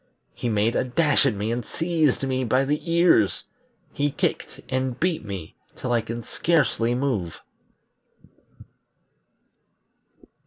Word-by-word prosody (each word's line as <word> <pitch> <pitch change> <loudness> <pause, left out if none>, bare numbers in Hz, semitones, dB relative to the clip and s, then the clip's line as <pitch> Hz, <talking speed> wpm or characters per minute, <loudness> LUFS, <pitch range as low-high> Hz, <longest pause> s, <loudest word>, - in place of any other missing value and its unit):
He 120 - -3
made 110 +1 +1
a - - +2
dash 140 +2 +3
at 120 - 0
me 105 +3 -2
and 120 +1 -2
seized 160 -2 0
me 130 0 0
by 130 +3 +2
the 150 +4 -2
ears; 170 - +4 0.5
he 145 +1 0
kicked - - -2
and 130 -1 -2
beat 170 -5 0
me 95 -6 -7 0.2
till 125 - -4
I 120 -1 +3
can 115 +1 -6
scarcely 120 -5 +1
move." 120 -11 -2
130 Hz, 125 wpm, -24 LUFS, 115-145 Hz, 0.5 s, ears